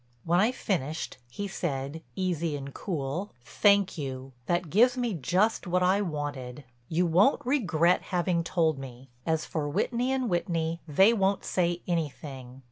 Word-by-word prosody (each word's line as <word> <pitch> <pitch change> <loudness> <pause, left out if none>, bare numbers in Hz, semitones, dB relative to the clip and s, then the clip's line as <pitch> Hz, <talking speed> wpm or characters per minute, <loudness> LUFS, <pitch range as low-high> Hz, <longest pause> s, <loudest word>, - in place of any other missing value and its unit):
When 175 +2 +2
I 215 +5 +4
finished 160 - -3
he 200 +11 -4
said, 150 -4 -3
easy 170 -5 -1
and 140 0 -8
cool: 165 +2 -3
"Thank 200 - +3
you—that 135 +5 -3
gives 245 +6 +5
me 240 -3 0
just 180 - +1
what 180 +1 +2
I 190 +3 +3
wanted. 145 -6 -4 0.3
You 170 +2 +2
won't 185 - +3
regret 180 - +2
having 175 -2 +1
told 160 -4 +1
me. 130 0 -10 0.2
As 160 -1 +1
for 150 -3 -2
Whitney 240 - 0
& - - -1
Whitney, 170 -7 -1
they 190 +9 +5
won't 195 -2 +1
say 175 -1 0
anything. 140 -6 -4
170 Hz, 145 wpm, -28 LUFS, 145-195 Hz, 0.3 s, gives